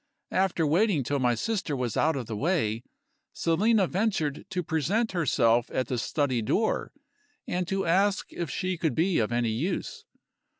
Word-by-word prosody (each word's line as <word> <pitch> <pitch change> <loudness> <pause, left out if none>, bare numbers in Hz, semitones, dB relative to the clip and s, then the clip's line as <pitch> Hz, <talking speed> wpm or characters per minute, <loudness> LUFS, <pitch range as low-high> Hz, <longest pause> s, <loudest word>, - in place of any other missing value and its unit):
After 185 -3 +1
waiting 170 0 +2
till 140 +3 -1
my 125 -2 +2
sister 195 - -2
was 125 -4 -2
out 160 0 +2
of 130 -3 -3
the 110 - -5
way, 115 - 0 0.5
Selina 200 +5 +2
ventured 180 -7 -1
to 180 -1 -2
present 170 - 0
herself 120 -9 +2
at 130 - -1
the 125 - -1
study 130 -3 0
door, 210 - 0 0.6
and 180 -1 -1
to 195 0 -1
ask 195 +4 +1
if 170 -3 -4
she 185 +5 -2
could 160 -8 0
be 170 +2 +2
of 110 0 0
any 120 -1 +1
use. 190 - -3
165 Hz, 165 wpm, -27 LUFS, 125-190 Hz, 0.6 s, waiting